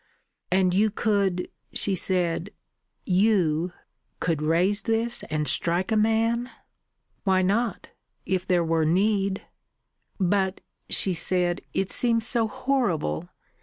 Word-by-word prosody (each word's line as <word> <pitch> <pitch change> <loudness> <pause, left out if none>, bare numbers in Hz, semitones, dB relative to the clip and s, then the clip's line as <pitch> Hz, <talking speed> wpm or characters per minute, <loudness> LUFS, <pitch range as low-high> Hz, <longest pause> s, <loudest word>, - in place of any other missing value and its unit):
"And 185 -1 +3
you 210 +3 +3
could," 200 -4 0 0.3
she 200 - 0
said, 180 -1 0 0.6
"you 180 -4 +2 0.5
could 165 -4 -1
raise 175 +6 +2
this 230 +1 -1
and 150 -1 -1
strike 175 +4 0
a - - +3
man?" 225 +3 +1 0.7
"Why 190 -2 +3
not? 220 +4 0 0.4
If 185 -1 -1
there 180 -2 +3
were 165 0 +1
need." 195 +3 +1 0.8
"But," 190 0 +1 0.3
she 190 - +2
said, 175 0 0
"it 190 0 0
seems 230 -2 +2
so 235 -2 +1
horrible. 225 - -1
190 Hz, 115 wpm, -25 LUFS, 175-220 Hz, 0.8 s, And